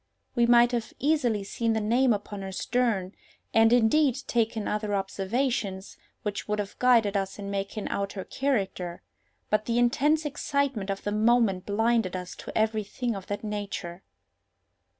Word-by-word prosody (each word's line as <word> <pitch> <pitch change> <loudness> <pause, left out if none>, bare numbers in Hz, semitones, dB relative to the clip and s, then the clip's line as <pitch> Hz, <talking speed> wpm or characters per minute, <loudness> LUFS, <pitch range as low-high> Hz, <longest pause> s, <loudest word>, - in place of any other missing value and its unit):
We 235 -1 +3
might 240 0 +6
have 235 -2 -3
easily 255 -8 +1
seen 230 +3 -1
the 220 - +1
name 240 +4 +3
upon 205 -1 -3
her 190 0 -5
stern, 210 -3 0 0.4
and, 225 0 +5
indeed, 245 +3 +4
taken 225 -3 0
other 210 -1 -1
observations, 195 0 -2 0.3
which 205 -1 -3
would 210 0 0
have 205 -1 -5
guided 230 -5 +4
us 195 -1 -1
in 200 -1 -5
making 200 +2 -3
out 200 0 -2
her 190 - -5
character; 190 -10 -2 0.5
but 215 0 +2
the 235 +1 0
intense 295 +6 +2
excitement 280 -7 -1
of 195 0 -3
the 205 - -2
moment 215 -3 +2
blinded 225 -2 +1
us 180 0 -6
to - - -6
every 220 0 +1
thing 235 +3 -3
of 195 -1 -8
that 205 +1 -4
nature. 200 -4 -5
215 Hz, 160 wpm, -27 LUFS, 200-240 Hz, 0.5 s, might